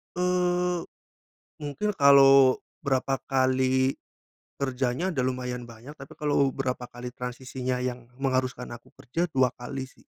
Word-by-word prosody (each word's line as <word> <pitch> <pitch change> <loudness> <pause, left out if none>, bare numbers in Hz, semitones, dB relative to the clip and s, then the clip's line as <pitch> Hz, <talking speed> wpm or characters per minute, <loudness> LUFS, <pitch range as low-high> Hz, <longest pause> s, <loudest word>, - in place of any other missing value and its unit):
Eee, 180 0 +1 0.8
mungkin 150 +9 -2
kalo 135 -2 +7 0.2
berapa 135 -1 0
kali 130 0 +2 0.7
kerjanya 130 +6 -1
udah 130 -7 -1
lumayan 125 -1 -3
banyak, 115 +3 -12
tapi 140 +3 -11
kalau 145 -3 +1
berapa 125 -1 -2
kali 125 0 -8
transisinya 125 0 -4
yang 125 -1 -4
mengharuskan 130 -2 -1
aku 120 0 -11
kerja, 165 +8 -2
2 130 -1 +3
kali, 135 +2 -5
sih. - - -23
130 Hz, 125 wpm, -27 LUFS, 125-140 Hz, 0.8 s, kalo